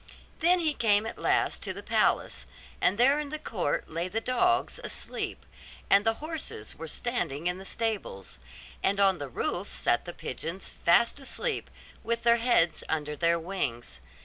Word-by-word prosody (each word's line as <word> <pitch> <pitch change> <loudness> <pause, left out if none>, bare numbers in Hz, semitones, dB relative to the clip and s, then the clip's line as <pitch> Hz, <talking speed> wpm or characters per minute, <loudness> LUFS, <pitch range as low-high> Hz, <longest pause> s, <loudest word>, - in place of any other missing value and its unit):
Then 355 +2 +4
he 310 -2 +2
came 220 -4 +3
at 225 - -6
last - - +1
to - - -2
the - - -8
palace, - - +1 0.3
and 185 +3 +3
there 270 +5 +5
in 295 -1 -4
the 310 - -4
court 195 - -2
lay 165 +2 -2
the 205 +5 -1
dogs 360 +10 +1
asleep; - - -4 0.5
and 200 +1 +7
the 225 +1 +2
horses 310 - -4
were 165 - -7
standing 165 - -2
in 180 +1 0
the 190 - -10
stables; 195 - -3 0.4
and 200 +1 +1
on 195 -2 +4
the 145 -2 -5
roof - - -3
sat - - +1
the - - -6
pigeons 185 +4 -4
fast 230 +10 +3
asleep, 445 - -2 0.3
with 230 +1 -1
their 235 0 +5
heads 230 -9 +3
under 150 -1 -1
their 170 +2 +2
wings. 140 - -3
200 Hz, 170 wpm, -29 LUFS, 165-245 Hz, 0.5 s, and